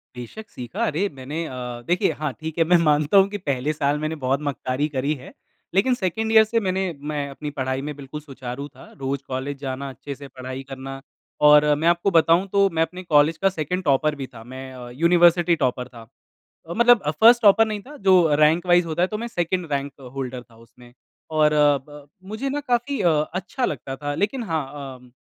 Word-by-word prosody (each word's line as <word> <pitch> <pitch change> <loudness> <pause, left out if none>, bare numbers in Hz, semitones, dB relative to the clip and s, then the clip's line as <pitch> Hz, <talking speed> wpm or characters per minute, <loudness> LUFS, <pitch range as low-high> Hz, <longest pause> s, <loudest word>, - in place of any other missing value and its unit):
बेशक 125 - -9
सीखा। 175 - -4
अरे 195 +2 0
मैंने 150 +6 -4
अ, - - -7 0.4
देखिए 175 -1 +2
हाँ 150 -3 -1
ठीक 160 +1 -6
है 165 - +4
मैं 175 - +8
मानता 150 +6 +3
हूँ 195 0 +6
कि 205 - -4
पहले 140 +3 0
साल 145 0 0
मैंने 155 +1 -2
बहुत 135 +2 +1
मक्कारी 135 +2 -2
करी 140 +4 0
है। - - -12 0.4
लेकिन 235 +7 +3
2nd 220 +4 -1
ईयर 220 -1 +8
से 230 - +2
मैंने 190 +1 0 0.3
मैं 150 -1 -2
अपनी 145 +2 -6
पढ़ाई 130 +1 -1
में 150 - -5
बिल्कुल 145 +2 -8
सुचारू 135 -1 -7
था। 145 - -16
रोज़ 135 0 -2
कॉलेज 135 +2 -4
जाना, 135 +1 -4
अच्छे 140 +1 -8
से 140 0 -11
पढ़ाई 130 +1 -6
करना 135 0 -7 0.4
और 150 0 +7 0.2
मैं 165 - +2
आपको 175 +3 +2
बताऊँ 165 +4 +4
तो 200 0 +4
मैं - - +3
अपने 180 +2 -9
कॉलेज 150 +2 +5
का - - +6
2nd 180 +4 -2
टॉपर 150 0 +2
भी 130 - -4
था 115 -1 -11
मैं 130 0 -7
अ, 125 -1 -9
यूनिवर्सिटी 170 +4 +4
टॉपर 125 0 -2
था। 115 -3 -14 0.6
मतलब 235 +4 +4
अ, 150 - -1
1st 230 +9 +6
टॉपर 225 +1 +6
नहीं 210 -2 -4
था 295 - -11
जो 185 - +8 0.3
रैंक 165 +4 +3
वाइज़ 175 -1 +5
होता 160 +2 -2
है 180 - +3
तो - - -1
मैं - - -3
2nd 175 -5 -2
रैंक 140 0 -1 0.2
होल्डर 130 -2 -4
था - - -18
उसमें। 120 0 -18 0.4
और 150 0 +4
अ, 145 -1 +4
ब 145 -1 -13 0.2
मुझे 265 +6 -3
ना 290 +2 -2
काफ़ी 245 0 0
अ 170 -3 +4 0.3
अच्छा 245 +7 -3
लगता 135 -1 -5
था 145 0 -2
लेक़िन 235 +4 -1
हाँ 160 -3 0 0.4
अ, 125 0 -19
150 Hz, 210 wpm, -23 LUFS, 135-185 Hz, 0.6 s, मैं